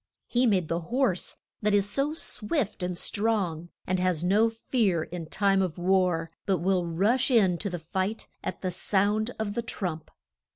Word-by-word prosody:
He 245 +1 +2
made 185 -6 +2
the 165 +1 -1
horse 190 +1 -1 0.2
that 210 -1 +2
is 200 -1 +3
so 275 +8 0
swift 220 - -2
and 180 -1 -2
strong, 190 -6 0 0.2
and 185 0 0
has 180 -3 +1
no 210 +5 +4
fear 225 -6 0
in 165 -1 -7
time 195 +2 +2
of 180 -5 -2
war, 180 -2 +1 0.2
but 190 -2 +3
will 180 +1 +1
rush 210 +11 +2
in 195 -9 +4
to 200 - -2
the 180 - -3
fight 190 +6 -3 0.2
at - - -5
the 185 - 0
sound 205 +4 +1
of 215 -2 -2
the 235 - -1
trump. 180 -8 -4
190 Hz, 175 wpm, -27 LUFS, 175-220 Hz, 0.2 s, no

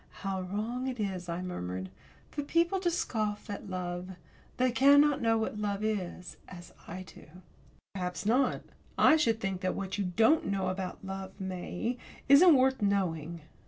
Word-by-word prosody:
"How 190 -1 -1
wrong 220 +7 -3
it 250 -2 -4
is," 185 -4 -3
I 170 +2 -3
murmured, 95 - -5 0.4
"for 295 - -3
people 335 +6 +1
to 360 -2 +1
scoff 215 -10 -2
at 200 0 -6
love. 180 0 -4 0.4
They 255 0 +2
cannot 285 +3 +5
know 225 -1 +3
what 220 -1 -2
love 205 0 -2
is 185 -4 -3
as 175 -1 -11
I 185 - -6
do." 185 - -15 0.7
"Perhaps 180 0 -4
not. 250 +4 +2 0.3
I 310 - +6
should 230 -8 +2
think 195 -3 -3
that 185 - -1
what 195 +1 -4
you 200 - 0
don't 220 - +3
know 195 -1 0
about 185 0 -5
love, 190 0 -7
May, 190 +5 -4 0.3
isn't 300 +4 +8
worth 265 -1 +3
knowing." 170 -5 -1
200 Hz, 160 wpm, -30 LUFS, 185-250 Hz, 0.7 s, isn't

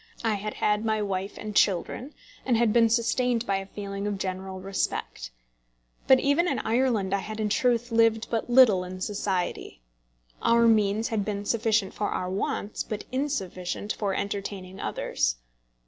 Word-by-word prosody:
I 225 -2 +2
had 210 +1 -4
had 210 0 +1
my 220 -1 +1
wife 195 0 -3
and 215 -1 -6
children, 205 - +1 0.3
and 245 -3 +2
had 230 -2 +3
been 230 -1 +5
sustained 235 +1 +1
by 195 -3 +1
a 195 0 -6
feeling 200 0 -5
of 205 -1 -2
general 190 0 -4
respect. 190 - -3 0.8
But 265 -1 +7
even 285 +6 +2
in - - 0
Ireland 225 -5 +1
I 200 - +2
had 215 +3 -6
in 215 -1 0
truth 240 +2 +1
lived 225 -1 +3
but 230 +1 -1
little 240 -7 +6
in 185 +1 -7
society. 190 - -2 0.6
Our 235 0 +4
means 215 -1 +3
had 220 -3 0
been 205 0 -3
sufficient 220 -3 +1
for 205 - -2
our 180 0 -2
wants, 200 +2 -2
but 210 -1 -4
insufficient 205 -8 -2
for 200 -3 -2
entertaining 195 -2 -4
others. - - -1
210 Hz, 165 wpm, -27 LUFS, 195-230 Hz, 0.8 s, But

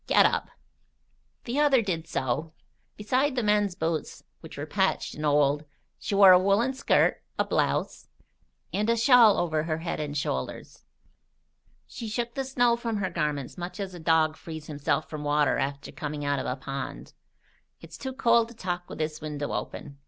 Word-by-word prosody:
Get - - +5
up." - - +1 0.9
The 255 +4 -2
other 275 -5 +4
did 165 -5 -3
so. 150 +5 -2 0.4
Beside 255 +6 +1
the 245 - 0
men's 210 -3 +2
boots, 160 -3 -3 0.2
which - - -11
were - - -4
patched - - 0
and 150 - -7
old, 145 0 +2 0.4
she 200 - -3
wore 195 -1 +9
a 180 - +8
woollen 200 +7 +2
skirt, 260 - +2 0.2
a - - +1
blouse, - - -1 0.7
and 210 +2 0
a 235 - +3
shawl 230 -3 +6
over 160 -3 0
her 155 -1 -1
head 165 0 -4
and 150 -1 -3
shoulders. 65 - -4 1.0
She 230 - -8
shook 235 +2 -3
the 270 - -2
snow 245 -3 +2
from 235 -2 -3
her 190 -3 -2
garments 150 -2 -3
much 175 +4 -6
as 195 -2 -4
a 175 - -9
dog 160 -1 +2
frees 160 -1 -8
himself 145 0 -1
from 150 -1 -6
water 145 -1 +2
after 140 +1 -3
coming 150 -2 -5
out 145 -1 0
of - - -4
a 125 - -1
pond. 135 +1 -6 0.7
"It's - - -12
too 265 -1 -5
cold 235 -3 +3
to 235 - -14
talk 180 -3 -4
with - - -8
this 155 0 -3
window 150 -1 -4
open. 140 0 -6
170 Hz, 180 wpm, -27 LUFS, 150-230 Hz, 1.0 s, wore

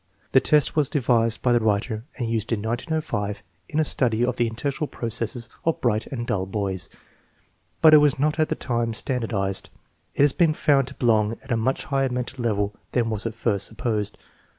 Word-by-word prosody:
The 130 - +6
test 150 +1 +3
was 150 -3 +2
devised 120 -6 +1
by 125 - +4
the 120 - +4
writer 110 +1 0
and 120 -4 -2
used 115 -1 -2
in 115 - +1
1905 115 -4 -2 0.3
in 150 - -1
a 155 - +3
study 120 -4 +2
of 125 -1 -1
the 120 - +1
intellectual 140 +7 -2
processes 115 0 -4 0.2
of 165 - 0
bright 110 -3 0
and 120 -3 -4
dull 95 -4 -1
boys, 95 -3 -3 0.9
but 155 -1 +9
it 155 - +10
was 145 0 +3
not 150 +3 0
at 155 - +2
that - - -2
time 115 -2 -1
standardized. 110 -7 -2 0.5
It - - +4
has 145 -2 +4
been 165 -3 +3
found 140 -4 +3
to 140 - -9
belong 110 -3 +2
at 135 - -10
a - - +3
much 115 +4 0
higher 135 -1 0
mental 125 0 -4
level 105 -3 0 0.2
than 115 -2 +1
was 110 +1 -1
at 110 - -6
first 105 -4 0
supposed. 110 -3 -2
120 Hz, 195 wpm, -24 LUFS, 110-135 Hz, 0.9 s, it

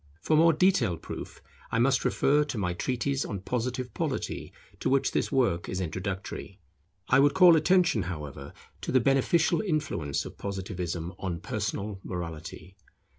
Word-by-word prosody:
For 155 - +1
more 165 +2 +6
detailed 150 - +2
proof, - - -8 0.3
I - - +1
must 130 +3 +3
refer 145 +2 +3
to 135 - -5
my 90 -4 -1
treatise 130 +8 -1
on 100 -3 -5
Positive 125 +3 -3
Polity, - - -3 0.3
to - - 0
which 135 0 +2
this - - -1
work 115 -10 +1
is 90 - -2
introductory. 95 +2 -5 0.5
I - - +5
would 140 +1 +4
call 180 -3 +8
attention, 170 - +3
however, 75 -6 -6 0.3
to - - -3
the 130 - +5
beneficial 135 - +2
influence 150 - -1
of - - -10
Positivism 90 -3 -4
on 90 -3 -3
personal 105 +1 -3
morality. 85 +1 -7
115 Hz, 150 wpm, -28 LUFS, 90-140 Hz, 0.5 s, call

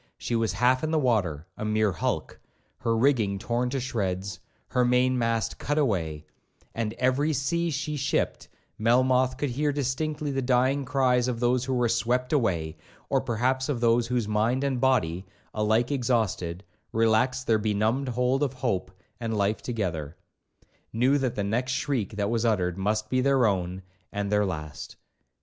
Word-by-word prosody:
She 120 - -2
was 115 -1 +1
half 125 +6 +2
in 155 - 0
the 160 - +1
water, 100 - +1
a - - -6
mere 110 -1 +2
hulk, 80 - -3 0.4
her 115 0 0
rigging 115 -6 +2
torn 120 +4 -1
to 135 +1 -2
shreds, 100 -6 -3 0.3
her 125 - +2
main 125 +1 +3
mast 115 -2 -1
cut 145 +1 -1
away, 85 - 0 0.5
and 110 -1 -2
every 130 +6 +1
sea 170 +5 0
she 150 0 -3
shipped, 135 - -1 0.3
Melmoth 130 +3 +3
could 140 -1 -1
hear 145 +4 0
distinctly 145 +2 -2
the 135 0 -1
dying 130 +2 +2
cries 130 -2 +2
of 120 -2 -2
those 125 +1 +1
who 130 0 -1
were 125 -1 +2
swept 120 +3 0
away, 85 - 0 0.3
or - - +3
perhaps 130 +4 0
of 135 -5 -1
those 115 0 +3
whose 120 -3 -1
mind 110 +5 +1
and 135 -3 -1
body, 100 -10 +2 0.3
alike 110 +4 +1
exhausted, 110 -9 -1 0.3
relaxed 115 +3 +2
their 110 -1 +3
benumbed 110 +5 0
hold 125 +3 +1
of 140 -3 0
hope 120 -9 -2 0.3
and 115 -2 -2
life 100 +1 0
together,—knew 105 - -3
that 130 -3 -1
the 100 - -1
next 120 +6 -1
shriek 120 -8 -1
that 100 +1 -1
was 115 -1 0
uttered 90 -6 +1
must 105 +3 -1
be 130 +3 +1
their 135 -2 +3
own 95 -2 -1 0.3
and 100 0 -3
their 105 -1 +3
last. 75 -6 -6
120 Hz, 165 wpm, -27 LUFS, 105-130 Hz, 0.5 s, main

